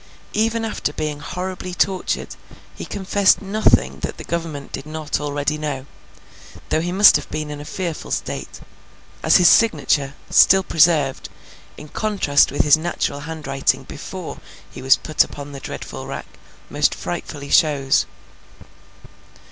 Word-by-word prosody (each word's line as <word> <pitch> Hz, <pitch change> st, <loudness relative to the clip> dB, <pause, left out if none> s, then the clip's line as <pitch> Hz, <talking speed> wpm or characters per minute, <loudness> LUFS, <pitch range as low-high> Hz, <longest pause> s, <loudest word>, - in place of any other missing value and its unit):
Even 225 Hz, +1 st, 0 dB
after 215 Hz, -8 st, -2 dB
being 150 Hz, -1 st, -4 dB
horribly 180 Hz, +1 st, -5 dB
tortured, 190 Hz, 0 st, -1 dB, 0.4 s
he -, -, -8 dB
confessed 195 Hz, 0 st, +2 dB
nothing 190 Hz, -, +2 dB
that -, -, -5 dB
the -, -, -8 dB
Government 165 Hz, -4 st, -5 dB
did 145 Hz, -, -6 dB
not 155 Hz, -1 st, -3 dB
already 145 Hz, +1 st, -2 dB
know; 145 Hz, -4 st, -4 dB, 0.8 s
though 160 Hz, -, +1 dB
he 175 Hz, +1 st, -2 dB
must 200 Hz, +3 st, +7 dB
have -, -, -9 dB
been 155 Hz, -1 st, -4 dB
in 145 Hz, 0 st, -7 dB
a -, -, -9 dB
fearful 170 Hz, -1 st, -5 dB
state—as -, -, -3 dB
his 180 Hz, -, +5 dB
signature, 145 Hz, -11 st, +3 dB, 0.2 s
still 190 Hz, 0 st, +6 dB
preserved, 155 Hz, -5 st, +2 dB, 0.5 s
in 150 Hz, -, -10 dB
contrast 190 Hz, -6 st, +2 dB
with 145 Hz, -, +1 dB
his 150 Hz, 0 st, +6 dB
natural 155 Hz, -3 st, -2 dB
hand 160 Hz, +1 st, -7 dB
writing 135 Hz, 0 st, 0 dB
before -, -, -8 dB, 0.3 s
he -, -, -9 dB
was 130 Hz, +1 st, +5 dB
put 155 Hz, -, +2 dB
upon 145 Hz, 0 st, -9 dB
the 140 Hz, -, -8 dB
dreadful -, -, -7 dB
rack, -, -, -6 dB, 0.4 s
most -, -, +1 dB
frightfully 140 Hz, -1 st, -6 dB
shows. 140 Hz, -4 st, +3 dB
155 Hz, 140 wpm, -21 LUFS, 145-180 Hz, 0.8 s, must